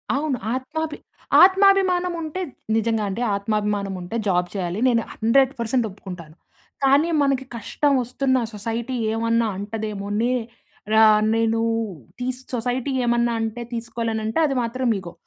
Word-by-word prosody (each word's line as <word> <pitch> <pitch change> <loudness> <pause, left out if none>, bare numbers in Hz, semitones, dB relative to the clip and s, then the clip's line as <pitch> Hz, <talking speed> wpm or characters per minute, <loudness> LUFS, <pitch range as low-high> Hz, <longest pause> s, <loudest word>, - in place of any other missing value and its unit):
అవును. 285 -2 -1 0.2
ఆత్మాభి 305 +4 -4 0.5
ఆత్మాభిమానం 375 -2 +4
ఉంటే 320 +3 -4 0.3
నిజంగా 225 -1 +1
అంటే 200 +5 -4
ఆత్మాభిమానం 205 -1 -1
ఉంటే 180 +6 -6
జాబ్ 180 -2 +2
చేయాలి. 185 -1 -3
నేను 235 -2 +3
100% 240 0 +2
ఒప్పుకుంటాను. 180 -5 -10 0.5
కానీ 280 +5 +4
మనకి 275 -2 +1
కష్టం 285 +6 0
వస్తున్న 260 +2 0 0.2
సొసైటీ 230 +4 -3 0.2
ఏమన్నా 230 0 +1
అంటదేమో, 205 0 -4
నే 240 +2 +1 0.6
ర - - +4 0.4
నేను 225 0 +1 0.6
టీసు 250 +1 -3
సొసైటీ 245 +3 -2
ఏమన్నా 235 0 +2
అంటే 225 +2 -3
తీసుకో‌లేను. 230 -1 -3
అంటే 220 +7 -1
అది 275 -3 0
మాత్రం 250 +2 -2
ఇగో. 175 -2 -9
230 Hz, 125 wpm, -23 LUFS, 215-265 Hz, 0.6 s, ఆత్మాభిమానం